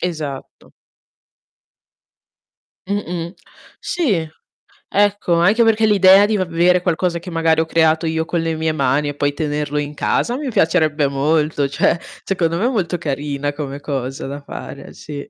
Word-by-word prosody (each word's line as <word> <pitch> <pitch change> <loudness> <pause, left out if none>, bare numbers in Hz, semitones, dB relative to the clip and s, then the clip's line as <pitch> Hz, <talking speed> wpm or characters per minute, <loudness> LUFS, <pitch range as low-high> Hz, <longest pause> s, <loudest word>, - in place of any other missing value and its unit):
Esatto. 155 -6 -6 2.1
Mh-mh. 180 -3 -3 0.5
Sì, 210 - 0 0.6
ecco 205 -3 +1
anche 205 +8 +4
perché 225 0 +3
l'idea 195 -1 +6
di 215 +1 0
v - - -1
avere 175 +1 +2
qualcosa 175 -1 0
che 175 - -9
magari 165 -1 +2
ho - - -1
creato 160 0 +2
io 160 0 -1
con 170 0 -1
le 165 -1 -1
mie 160 0 0
mani, 140 0 +1
e 145 - -5
poi 145 0 0
tenerlo 150 -1 -2
in 145 0 -2
casa 240 +10 0
mi 285 -3 -4
piacerebbe 155 -6 +2
molto, 145 +1 +1
cioè 155 +4 +1 0.2
secondo 170 -3 0
me 205 - 0
è 250 - +3
molto 185 -7 -1
carina 145 -2 -3
come 145 -1 -6
cosa 135 -2 -4
da 140 +1 -6
fare, 140 0 -9
eh - - -12
sì. 145 -2 -8
160 Hz, 155 wpm, -19 LUFS, 145-180 Hz, 2.1 s, l'idea